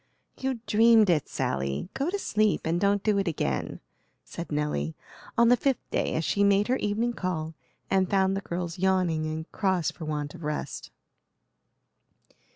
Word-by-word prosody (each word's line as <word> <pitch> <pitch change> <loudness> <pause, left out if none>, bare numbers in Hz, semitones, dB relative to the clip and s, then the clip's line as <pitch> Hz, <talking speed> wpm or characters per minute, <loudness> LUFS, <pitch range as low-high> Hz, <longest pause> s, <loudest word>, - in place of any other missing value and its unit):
"You 260 -3 -3
dreamed 220 -1 +5
it, 155 -4 0
Sally. 70 +1 -2
Go 275 +5 -1
to 400 - -1
sleep, 215 - +1
and 170 +2 0
don't 200 0 +2
do 210 -2 +2
it 195 - -1
again," 70 - -2 0.4
said 170 - -7
Nelly, 145 - -1 0.4
on 235 0 +6
the 245 - +7
fifth 270 +1 -1
day, - - 0
as 160 - 0
she 200 - +2
made 200 +2 +3
her 255 - +3
evening 225 +3 0
call 165 -6 -3 0.3
and 190 -2 +2
found 190 -1 +2
the 195 - -2
girls 175 -1 -4
yawning 180 -4 +1
and 160 +1 -5
cross 185 -5 0
for 165 - -8
want 150 -1 -3
of 170 - -11
rest. 150 0 -4
185 Hz, 165 wpm, -27 LUFS, 155-210 Hz, 0.4 s, the